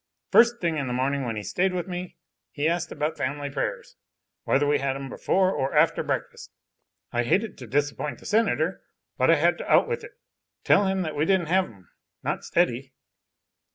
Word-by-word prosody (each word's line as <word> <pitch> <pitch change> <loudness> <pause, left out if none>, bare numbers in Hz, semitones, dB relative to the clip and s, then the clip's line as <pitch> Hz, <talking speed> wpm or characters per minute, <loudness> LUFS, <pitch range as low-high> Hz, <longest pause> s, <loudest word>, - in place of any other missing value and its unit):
First 235 0 +5
thing 165 -3 0
in 140 -3 -2
the 125 - -2
morning 135 +2 0
when 115 -2 -3
he 105 - -4
stayed 180 - 0
with 180 0 -3
me 180 0 -6 0.3
he 145 +1 -1
asked 170 +1 -1
about 150 +1 -2
family 140 +1 -3
prayers, 135 -1 -4 0.5
whether 145 +2 +2
we 145 0 +2
had 135 -1 -1
'em 135 0 -6
before 185 +7 +1
or 135 -4 -2
after 155 +1 +4
breakfast. - - -4 0.6
I 120 - +1
hated 195 - 0
to 125 - -9
disappoint 145 +3 -1
the - - -17
Senator, 200 -5 +1 0.4
but - - +3
I - - +7
had - - +2
to - - -4
out - - +5
with 470 -1 -3
it, - - -11 0.5
tell 200 - +4
him 190 -1 0
we 150 - +1
didn't 185 -3 +1
have 190 +1 +3
'em, 95 -6 -17 0.4
not - - -2
steady. 135 -6 0
150 Hz, 190 wpm, -25 LUFS, 135-185 Hz, 0.6 s, I